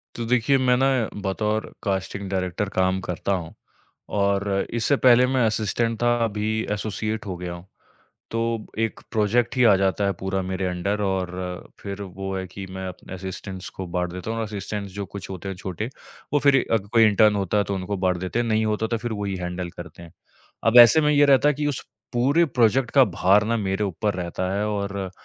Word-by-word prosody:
तो 115 - -4
देखिए 125 +3 +3
मैं 125 -1 +3
ना 135 +1 +3 0.4
बतौर 105 +2 -2
कास्टिंग 100 0 -2
डायरेक्टर 95 +1 -2
काम 95 0 +2
करता 90 +2 -3
हूँ। 85 -4 -2 0.7
और 100 0 +1 0.3
इससे 120 +5 +2
पहले 125 0 +6
मैं 130 -2 +2
असिस्टेंट 110 +2 -1
था, 120 0 +3
अभी 110 +1 -1
एसोसिएट 110 +1 -3
हो 95 -2 -4
गया 90 -1 -5
हूँ। 85 +2 -11 0.7
तो 115 - -1 0.4
एक 115 -1 -1
प्रोजेक्ट 110 +4 +1
ही 125 - +3
आ 105 -4 +7
जाता 95 +1 +1
है 100 - +1
पूरा 95 0 -1
मेरे 95 0 -2
अंडर। 90 +4 -1
और 95 -2 -1 0.5
फिर 100 0 -6
वो 95 0 -5
है 95 0 -4
कि 95 +1 -8
मैं 95 0 -5
अपने 90 +1 -9
असिस्टेंट्स 95 0 -6
को 95 - -4
बाँट 90 -1 -1
देता 90 +4 -6
हूँ 115 - -2
और 110 - -1
असिस्टेंट्स 100 -1 -5
जो 100 -1 -4
कुछ 100 - -7
होते 95 +1 -6
हैं 95 - -3
छोटे 95 +5 -4 0.4
वो 145 - +4
फिर 135 -1 +4
अग 100 -3 0
कोई 115 -1 +6
इंटर्न 105 0 +4
होता 100 +1 0
है 100 - +2
तो 100 - -3
उनको 95 +2 -3
बाँट 90 -1 +1
देते 95 +6 -3
हैं, 120 - +1
नहीं 110 0 +1
होता 110 +1 0
तो 115 +1 -1
फिर 120 0 -4
वो 105 -1 -3
ही 95 -1 -2
हैंडल 90 0 -4
करते - - -10
हैं। 85 -1 -13 0.5
अब 115 +2 +3
ऐसे 120 +6 +9
में 150 0 +3
ये 145 0 +5
रहता 140 +1 +5
है 150 - +3
कि 145 +1 -2
उस 145 - -3 0.3
पूरे 140 +8 +3
प्रोजेक्ट 120 -1 +2
का 135 -2 +6
भार 100 +1 +3
ना 115 +1 0
मेरे 100 0 -1
ऊपर 100 +2 -1
रहता 90 +1 -3
है। 105 +1 0
और 100 -2 -3
100 Hz, 210 wpm, -24 LUFS, 95-115 Hz, 0.7 s, ऐसे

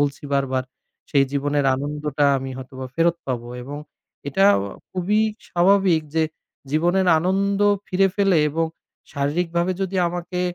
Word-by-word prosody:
বলছি 145 0 -1
বারবার 130 -2 0 0.5
সেই 140 -1 +4
জীবনের 145 0 0
আনন্দটা 145 +1 -2
আমি 135 0 -6
হয়তোবা 130 0 -8
ফেরত 170 +1 +2
পাবো। 120 -2 -3
এবং 145 +3 -7 0.5
এটা 195 +8 +2 0.5
খুবই 190 +4 +1 0.3
স্বাভাবিক 185 -1 +3
যে 160 - +3 0.5
জীবনের 175 +5 +2
আনন্দ 195 +4 0 0.3
ফিরে 195 +1 +3
পেলে 195 -4 +3
এবং 165 +2 0 0.5
শারীরিকভাবে 170 +5 0
যদি 190 0 -2
আমাকে 175 +1 -4
165 Hz, 125 wpm, -22 LUFS, 140-185 Hz, 0.5 s, সেই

